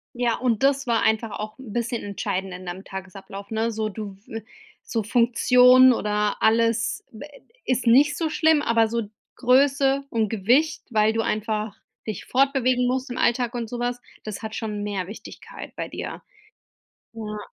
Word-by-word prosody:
Ja, 240 -1 +1
und 240 -2 0
das 275 -1 +2
war 230 -1 +2
einfach 220 0 +1
auch 215 0 -6
'n 260 -5 -10
bisschen 235 0 -2
entscheidend 195 -2 -3
in 180 +1 -9
deinem 180 +2 -6
Tagesablauf, 195 +1 -9
ne, 225 +1 -1
so 220 -1 -2
du 205 -2 -7
w 225 0 -6 0.4
so 225 -2 -2
Funktionen 250 +3 +6
oder 210 -2 0
alles, 230 +1 +2
wä 230 +6 -10 0.4
ist 255 -1 -1
nicht 280 +4 +5
so 325 -2 -1
schlimm, 315 -1 +3
aber 230 -4 +3
so 230 0 -1 0.3
Größe 275 +2 +3
und 225 -4 0
Gewicht, 240 +10 +2
weil 220 -2 +3
du 225 - 0
einfach 215 -1 -2 0.3
dich 215 - -5
fortbewegen 255 -2 +2
musst 260 +1 -1
im 245 - -5
Alltag 240 0 +1
und 235 -2 -4
sowas, 245 +1 -3 0.2
das 215 -2 -6
hat 220 -1 -6
schon 210 -2 -4
mehr 200 -3 -3
Wichtigkeit 210 - -10
bei - - -4
dir? - - -6 0.9
Ja. 215 -2 -6
230 Hz, 165 wpm, -24 LUFS, 215-250 Hz, 0.9 s, Funktionen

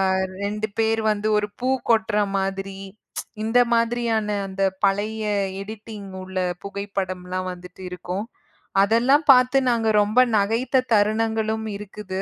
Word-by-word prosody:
அ - - +1 0.3
2 210 +1 -2
பேர் 225 0 +2
வந்து 210 0 -1
ஒரு 205 0 0
பூ 255 - 0 0.2
கொட்டுற 220 -1 +2 0.2
மாதிரி 195 0 -3 0.4
ம்ச் - - -2 0.2
இந்த 225 +3 +3
மாதிரியான 230 -2 +1 0.2
அந்தப் 190 0 -1
பழய 210 +3 0 0.4
எடிட்டிங் 210 0 -8
உள்ள 190 0 -7 0.3
புகைப்படம்லாம் 185 -2 -4
வந்துட்டு 180 +1 -11
இருக்கும். 180 +3 -4 0.6
அதெல்லாம் 245 +8 +3
பாத்து 255 +1 +5
நாங்க 230 -2 +2
ரொம்ப 210 +4 +2 0.2
நகைத்த 230 +6 +1
தருணங்களும் 220 +1 +1
இருக்குது. 200 -2 -6
210 Hz, 125 wpm, -23 LUFS, 195-225 Hz, 0.6 s, பாத்து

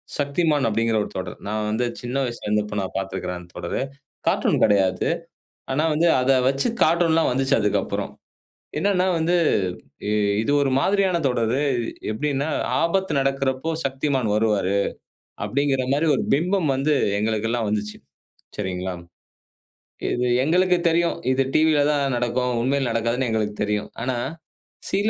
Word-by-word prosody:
Shaktimaan 145 +1 +1
அப்படிங்கிற 115 +1 +1
ஒரு - - -7
தொடர். 90 -1 -5
நான் 105 0 -2
வந்து 110 +3 0
சின்ன 125 +1 -5
வயசுல 120 -3 -5
இருந்தபோ 105 0 0
நான் 95 - -4
பார்த்துருக்கிறேன் 95 -2 -3
அந்த 90 0 -14
தொடரு. 85 +7 -3 0.5
கார்ட்டூன் - - +2
கெடையாது. 95 -3 +3 0.6
ஆனா 140 +4 +1
வந்து 165 +3 +2
அத 130 +1 +2 0.2
வச்சு 135 - +1
கார்ட்டூன்லாம் 165 -1 +3
வந்துச்சு 135 +1 +2
அதுக்கப்பறம். 105 -1 -1 0.7
என்னனா 190 -2 +2
வந்து 165 +2 +1 0.7
இ - - +1 0.3
இது 145 - 0
ஒரு 135 - +1
மாதிரியான 190 +1 +2
தொடரு. 120 +2 0 0.5
எப்பிடினா 145 +4 -1 0.3
"ஆபத்து 190 +1 +1
நடக்குறப்போ 135 +2 0
Shaktimaan 135 -2 -1
வருவாரு" 105 -3 +1 0.7
அப்படிங்கற 135 -1 0
மாரி 150 +3 +1
ஒரு - - -1
பிம்பம் 175 +2 +1
வந்து 140 +3 +1 0.3
எங்களுக்கெல்லாம் 110 +1 0
வந்துச்சு. 105 0 -2 0.6
சரிங்களா? 95 -2 -3 1.2
இது 125 +1 0 0.2
எங்களுக்கு 180 +4 +3
தெரியும், 170 +1 +2 0.2
இது 135 +1 +2
டிவில 155 -1 +4
தான் 140 -2 0
நடக்கும். 120 +1 0
உண்மையிலே 135 0 +1
நடக்காதுன்னு 115 +3 0
எங்களுக்கு 105 -1 -1
தெரியும். 105 0 -2
ஆனா, 125 +2 -1 0.8
சில 205 +3 +2
130 Hz, 130 wpm, -23 LUFS, 110-150 Hz, 1.2 s, டிவில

